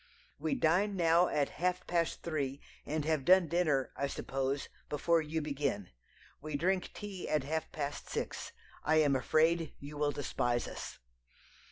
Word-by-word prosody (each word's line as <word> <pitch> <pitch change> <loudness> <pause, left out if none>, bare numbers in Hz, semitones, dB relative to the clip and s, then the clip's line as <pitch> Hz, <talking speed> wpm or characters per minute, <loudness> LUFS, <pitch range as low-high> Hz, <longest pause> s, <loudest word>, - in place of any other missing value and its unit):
"We 275 - 0
dine 200 -1 +2
now 170 0 +4
at 145 -1 +1
half 180 0 +1
past 170 -1 0
three, 140 -4 -2 0.3
and 150 0 -1
have 155 -3 +1
done 185 +3 +6
dinner, 155 -6 +1
I 140 - 0
suppose, 135 0 -2 0.2
before 165 +3 +2
you 155 0 -2
begin. 140 -10 -2 0.5
We 155 0 -4
drink 185 +4 +1
tea 200 -3 -6
at 150 -3 +2
half 160 +3 -2
past 145 -1 -4
six. - - -3 0.3
I 155 - +3
am 150 -3 +4
afraid 160 +5 +2
you 145 +1 -8
will 145 -1 +2
despise 120 -4 -1
us. - - -7
155 Hz, 155 wpm, -33 LUFS, 140-170 Hz, 0.5 s, done